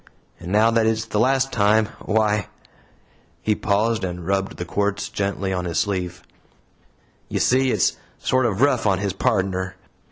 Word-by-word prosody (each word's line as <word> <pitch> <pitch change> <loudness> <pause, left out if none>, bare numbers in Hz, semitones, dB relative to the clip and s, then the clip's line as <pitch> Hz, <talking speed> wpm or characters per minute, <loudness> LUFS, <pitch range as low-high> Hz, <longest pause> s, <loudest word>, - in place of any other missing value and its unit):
And 90 - -7
now 110 +3 +4
that 115 -1 +2
it's 110 0 0
the 105 -2 -2
last 135 +3 +2
time, 110 0 +3
why" 105 -2 +1 1.0
he 110 - +2
paused 105 +1 0
and 90 -2 -4
rubbed 95 +1 -1
the 90 - -4
quartz 100 +2 -1
gently 100 -1 -2
on 90 -1 -2
his 85 -2 -3
sleeve 90 -4 -2 1.1
"you - - -1
see 130 +1 +3
it's - - +1 0.2
sort 130 -1 +1
of 105 0 -2
rough 130 -6 +3
on 95 -2 +3
his 100 0 -2
pardner. 95 -2 -1
105 Hz, 160 wpm, -22 LUFS, 95-110 Hz, 1.1 s, now